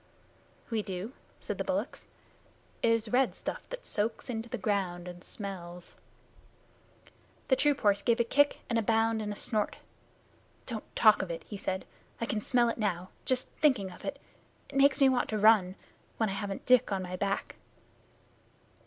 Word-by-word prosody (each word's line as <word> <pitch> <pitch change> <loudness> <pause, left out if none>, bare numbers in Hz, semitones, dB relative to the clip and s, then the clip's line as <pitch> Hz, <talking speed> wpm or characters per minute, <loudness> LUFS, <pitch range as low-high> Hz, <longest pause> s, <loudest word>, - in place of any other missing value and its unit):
"We 225 -1 +1
do," 195 +4 -5 0.3
said - - -4
the - - +1
bullocks. - - -3 0.7
"It 230 - +3
is 230 -1 +1
red 255 +1 +3
stuff - - -5
that - - -7
soaks 225 +4 -2
into 225 0 -4
the - - -3
ground 185 -3 -1
and 175 0 -9
smells." 180 -4 -7 1.5
The 260 - +6
troop 290 +1 +2
horse 205 -2 +3
gave 235 +3 +2
a - - +5
kick 290 +5 +3
and 230 -1 +1
a - - +2
bound 225 0 +2
and 210 -1 -3
a - - -4
snort. 215 -1 -1 0.9
"Don't 225 -4 -7
talk 215 -1 +6
of 190 - -4
it," 170 - -5
he 210 - -8
said. 190 -1 -3 0.3
"I 230 - -1
can 215 -2 -2
smell 240 +2 +3
it 230 - -3
now, 185 -4 -1 0.2
just 255 -1 +1
thinking 255 -11 +3
of - - -13
it. 285 - -3 0.5
It - - -11
makes 275 +1 +5
me 275 - +7
want 255 -2 +2
to 215 - -1
run 205 -3 +5 0.4
when 220 -2 +1
I - - -2
haven't 200 0 -4
Dick 250 -4 +5
on 190 -1 -1
my 180 0 -5
back." 195 +1 -2
215 Hz, 180 wpm, -30 LUFS, 195-240 Hz, 1.5 s, me